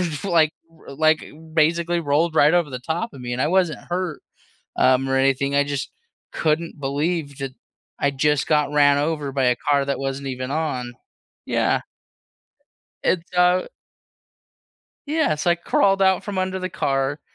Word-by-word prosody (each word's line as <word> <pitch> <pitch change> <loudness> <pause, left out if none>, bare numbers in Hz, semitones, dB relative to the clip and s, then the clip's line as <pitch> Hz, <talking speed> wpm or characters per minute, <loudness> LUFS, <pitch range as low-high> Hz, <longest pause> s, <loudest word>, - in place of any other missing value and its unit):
f 150 - -6
like 165 -5 +3 0.2
r 160 -4 -13
like 155 0 +3 0.3
basically 170 +2 +2
rolled 160 +2 +1
right 150 +3 +5
over 170 -5 +2
the 125 - -5
top 165 - -3
of 130 - -10
me, 120 0 -5
and 125 - -4
I - - +2
wasn't 180 -3 +1
hurt, 180 -4 -2 0.6
um, 130 +1 +3
or 135 - +2
anything, 135 +1 +1
I 145 - +4
just 140 -1 -4 0.4
couldn't 160 0 -1
believe 145 +1 -2
that 135 -1 -5 0.5
I 140 - +2
just 145 +1 +1
got 150 -1 +1
ran 145 -1 +4
over 150 -2 -2
by 135 -1 0
a 125 -1 +3
car 140 +1 +1
that 140 - -1
wasn't 135 0 -4
even 130 0 -4
on 130 -6 -2 0.5
Yeah. - - +1 1.2
It's 180 0 -1
uh 180 +1 +3 1.4
Yeah, 305 - +1
so, 155 +4 0
I 170 - +2
crawled 195 +3 +2
out 190 -1 +3
from 205 -2 -5
under 185 0 -1
the 185 0 -3
car, 135 -3 -1
150 Hz, 165 wpm, -22 LUFS, 140-170 Hz, 1.4 s, right